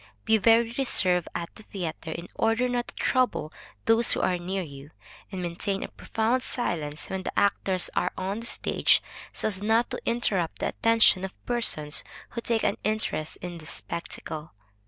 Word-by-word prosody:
Be 220 0 +4
very 230 +2 +4
reserved 180 -9 +3
at 170 0 -4
the - - -14
theatre, 170 -6 -5
in 170 +2 -6
order 225 +3 +2
not 245 -1 -1
to - - -10
trouble 250 - +1 0.3
those 225 +1 +5
who - - 0
are 180 -1 +1
near 185 +2 -2
you, 140 -2 -10 0.4
and 185 -2 -4
maintain 180 +3 -2
a - - -6
profound 230 +3 0
silence 155 - -1
when 190 0 -3
the - - -1
actors 190 -2 +2
are 180 - +1
on 195 +3 -2
the 230 - -5
stage, - - +3 0.3
so - - +1
as 200 -3 +1
not 225 +3 +2
to - - -3
interrupt 200 -8 +1
the - - -1
attention 225 -4 +5
of 190 - -7
persons 155 -11 0 0.3
who 235 - -5
take 230 -1 0
an - - +1
interest 215 -7 -1
in 175 -1 -5
the 155 - -12
spectacle. 160 -2 -6
195 Hz, 175 wpm, -27 LUFS, 170-230 Hz, 0.4 s, those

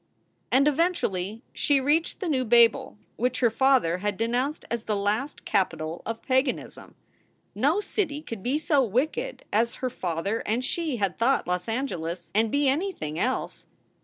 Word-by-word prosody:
And 275 +3 +4
eventually 245 - 0
she 285 -2 +2
reached 300 +9 +1
the 375 - -2
new 270 -5 +1
Babel, 235 -2 +4 0.2
which 250 +2 0
her 240 -2 +4
father 250 -9 +3
had 205 0 -2
denounced 245 +6 -1
as 235 -2 -2
the 215 - 0
last 210 +8 -2
capital 165 -4 -1
of 225 0 -4
paganism. 260 +2 -1 0.6
No 290 - +2
city 310 -8 -2
could 225 -8 -7
be 255 +8 0
so 300 -2 +2
wicked 310 - -1
as 230 +3 +2
her 255 -1 -3
father 185 +2 -2
and 235 +4 -1
she 320 -5 -1
had 195 -4 -1
thought 265 +4 +2
Los 180 0 -2
Angeles, 180 -9 -3
and 220 +1 +2
be 285 0 +2
anything 270 - -1
else. 255 +5 -2
240 Hz, 160 wpm, -26 LUFS, 205-285 Hz, 0.6 s, And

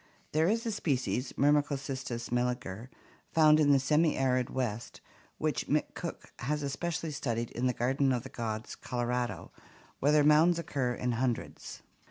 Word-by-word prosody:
There 155 +2 +2
is 230 +4 +1
a 230 - 0
species, 130 - -1
Myrmecocystus 140 -4 0
melliger, 120 -3 -2 0.4
found 155 -1 +6
in 145 -2 +4
the 140 - +6
semi 150 +4 +2
arid 130 -2 +1
West, 115 -4 -3 0.4
which - - -1
McCook - - -3
has 150 +3 -2
especially 160 +3 -3
studied 120 -5 -2
in 125 +2 -1
the - - +3
Garden 135 +3 +1
of 125 -2 0
the 135 - -8
Gods, 110 -3 -4
Colorado, 120 -5 -3 0.5
where 145 - +3
their 150 -1 +5
mounds 155 +4 +5
occur 135 -7 -1
in 125 0 -1
hundreds. 120 0 -3
130 Hz, 150 wpm, -31 LUFS, 120-150 Hz, 0.5 s, found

